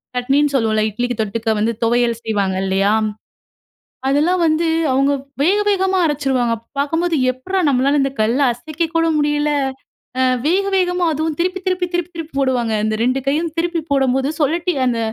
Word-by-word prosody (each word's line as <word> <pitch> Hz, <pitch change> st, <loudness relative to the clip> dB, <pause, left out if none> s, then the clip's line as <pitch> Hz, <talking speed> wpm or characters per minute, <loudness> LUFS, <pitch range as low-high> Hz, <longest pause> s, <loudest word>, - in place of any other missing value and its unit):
சட்னின்னு 275 Hz, +3 st, +1 dB
சொல்லுவோம்ல. 220 Hz, -4 st, +1 dB
இட்லிக்கி 245 Hz, +3 st, -2 dB
தொட்டுக்க 220 Hz, +2 st, -2 dB
வந்து 225 Hz, +2 st, +1 dB
துவையல் 235 Hz, 0 st, +2 dB
செய்வாங்க 200 Hz, -4 st, -1 dB
இல்லயா? 195 Hz, +2 st, +1 dB, 1.2 s
அதெல்லாம் 325 Hz, +6 st, +2 dB
வந்து 315 Hz, +2 st, +1 dB, 0.3 s
அவுங்க 275 Hz, +2 st, +2 dB, 0.3 s
வேக 380 Hz, +7 st, +3 dB
வேகமா 380 Hz, -1 st, +1 dB
அரச்சிருவாங்க. 265 Hz, -5 st, 0 dB, 0.2 s
பார்க்கும்போது, 325 Hz, +4 st, 0 dB, 0.2 s
எப்புட்றா 375 Hz, +10 st, -3 dB
நம்மளால 275 Hz, +2 st, +2 dB
இந்த 270 Hz, -, -1 dB
கல்ல 230 Hz, +6 st, +1 dB
அசைக்கக்கூட 320 Hz, +5 st, -2 dB
முடியல 295 Hz, 0 st, +1 dB, 0.7 s
அ -, -, +3 dB, 0.2 s
வேக, 385 Hz, +4 st, +2 dB
வேகமா 360 Hz, -1 st, +1 dB
அதுவும் 310 Hz, 0 st, -2 dB
திருப்பி, 370 Hz, +2 st, 0 dB
திருப்பி, 365 Hz, -1 st, 0 dB
திருப்பி, 350 Hz, -1 st, -2 dB
திருப்பி 325 Hz, -3 st, -7 dB
போடுவாங்க. 255 Hz, -4 st, 0 dB
இந்த 215 Hz, -, 0 dB
2 255 Hz, +2 st, +1 dB
கையும் 315 Hz, +4 st, 0 dB
திருப்பி 340 Hz, 0 st, 0 dB
போடம்போது, 270 Hz, -1 st, +1 dB
சொழட்டி 335 Hz, +5 st, +1 dB
அந்த 240 Hz, -2 st, 0 dB
285 Hz, 145 wpm, -18 LUFS, 245-335 Hz, 1.2 s, வேக